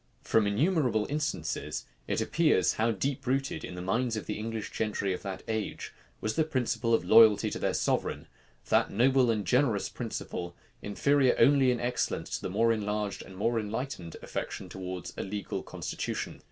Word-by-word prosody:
From 110 -2 +3
innumerable 125 - +2
instances, 155 +1 -2 0.2
it - - 0
appears 155 - +3
how 110 +2 +1
deep 130 +6 -2
rooted, 135 +1 0
in 90 - -6
the 90 - -5
minds 115 +4 0
of 110 - -5
the 105 - -4
English 110 -1 -4
gentry 105 -3 -1
of 90 - -5
that 95 -1 -6
age, 110 -1 -3 0.3
was 110 0 -1
the 160 - +3
principle 120 -6 +1
of - - -1
loyalty 110 -2 +7
to - - -4
their - - 0
sovereign; - - 0 0.4
that - - +3
noble 130 +3 +3
and 105 -3 0
generous 125 -3 +2
principle, 85 0 -5 0.3
inferior 135 +6 +2
only 140 -2 +5
in 125 -1 +1
excellence 125 +1 -1
to - - -12
the - - -3
more 115 +4 +3
enlarged 105 -1 -2
and 95 - -11
more 115 +3 +1
enlightened 110 - -4
affection - - -5
towards 90 -1 -6
a - - -2
legal 100 +1 -4
constitution. - - -4
115 Hz, 170 wpm, -29 LUFS, 100-130 Hz, 0.4 s, loyalty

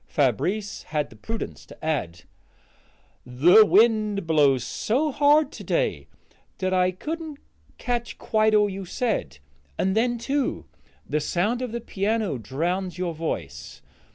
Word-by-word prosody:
Fabrice 180 - 0
had 150 -3 -3
the - - -13
prudence 225 - -6
to - - -12
add: 90 - -2 1.0
"The 150 - +6
wind 215 -3 +3
blows 145 -6 +3
so 280 - -1
hard 290 +2 +4
to - - -9
day - - -1 0.5
that 185 0 -1
I 185 0 +3
couldn't 310 - -6 0.4
catch 240 -1 -3
quite 215 0 +2
all 210 -1 +4
you 195 0 -5
said; 180 - -2 0.4
and 190 +1 0
then, 240 +2 +1
too, 275 +4 -2 0.4
the 150 +1 0
sound 205 - 0
of 250 -3 -3
the 235 +1 -4
piano 210 - -1
drowns 175 - -2
your 180 -2 -2
voice. 155 - -5
200 Hz, 135 wpm, -25 LUFS, 160-235 Hz, 1.0 s, The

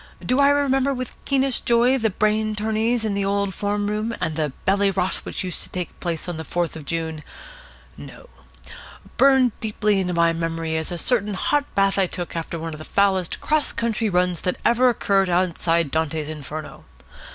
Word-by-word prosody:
Do 255 +2 +1
I 280 0 +6
remember 275 -1 +2
with 255 0 -4
the - - -20
keenest 270 -2 +1
joy 240 +2 +4
the 225 -4 +1
brain 215 +2 0
tourneys 220 +2 0
in 210 - 0
the 200 0 -1
old 200 0 0
form 205 +1 -1
room, 215 +2 -2
and 160 - -2
the 150 -3 -1
bally 200 +1 +3
rot 190 -1 0
which - - -5
used 180 -2 -4
to - - -7
take 180 -1 -6
place 170 -2 -3
on 175 -2 -4
the 160 - -5
Fourth 170 0 -2
of 155 -3 -8
June? 160 0 -3 0.7
No. - - -12 0.9
Burned 265 -3 +5
deeply 210 -2 0
into 180 -2 -1
my 170 0 +3
memory 165 -1 -2
is 160 +1 -2
a 175 - -3
certain 210 0 +1
hot 290 +9 +1
bath 195 0 +3
I 190 - +3
took 175 -1 -6
after 165 0 -4
one 165 0 -5
of 155 - -8
the - - -7
foulest 190 -1 +1
cross 305 -1 +1
country 230 -1 -1
runs 180 -2 +1
that 180 - -1
ever 245 +2 +4
occurred 195 -5 +1
outside 170 -3 +1
Dante's 160 -1 -1
Inferno. 155 0 -7
195 Hz, 195 wpm, -23 LUFS, 170-225 Hz, 0.9 s, I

